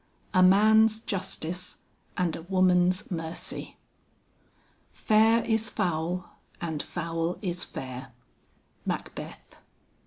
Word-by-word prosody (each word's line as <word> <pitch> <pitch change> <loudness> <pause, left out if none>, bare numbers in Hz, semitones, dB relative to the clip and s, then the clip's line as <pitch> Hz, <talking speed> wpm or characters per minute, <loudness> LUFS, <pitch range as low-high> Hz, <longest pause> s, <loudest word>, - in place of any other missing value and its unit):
A 185 - +5
MAN'S 220 +4 +6
JUSTICE 180 -3 -3 0.4
AND 175 -3 +1
A - - -7
WOMAN'S 185 0 +2
MERCY. 165 -1 -4 1.1
"Fair 225 +2 +4
is 220 -1 +1
foul 175 +1 -1 0.3
and 160 -3 -3
foul 165 0 -3
is 180 -2 -2
fair." 130 0 -7 0.7
MACBETH. - - -6
180 Hz, 90 wpm, -28 LUFS, 165-200 Hz, 1.1 s, MAN'S